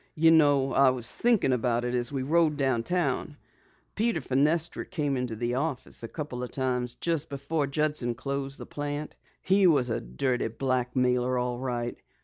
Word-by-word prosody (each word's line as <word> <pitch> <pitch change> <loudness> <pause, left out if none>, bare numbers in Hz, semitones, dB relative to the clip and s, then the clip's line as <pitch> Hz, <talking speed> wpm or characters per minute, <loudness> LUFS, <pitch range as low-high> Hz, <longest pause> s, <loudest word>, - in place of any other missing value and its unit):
You 160 +1 +5
know, 145 -4 +4
I 135 -1 +5
was 125 -2 0
thinkin' 230 - +2
about 120 -1 0
it 125 - -2
as 120 0 0
we 135 -2 -2
rode 155 +1 +2
downtown. 140 +3 0 0.6
Peter 225 -4 0
Fenestra 150 +5 +1
came 150 -6 -2
into 125 -3 -3
the 120 +2 -2
office 135 -1 -2
a 115 - -5
couple 140 -3 -6
of 125 - -4
times 125 -2 -2
just 165 -3 -1
before 140 +2 -2
Judson 145 -4 0
closed 140 +1 -4
the - - -8
plant. 145 +1 -5 0.3
He 190 0 +4
was 135 -7 +3
a - - -1
dirty 120 - -1
blackmailer, 125 +1 0
all 125 0 -2
right! 120 -2 -3
135 Hz, 165 wpm, -28 LUFS, 125-150 Hz, 0.6 s, You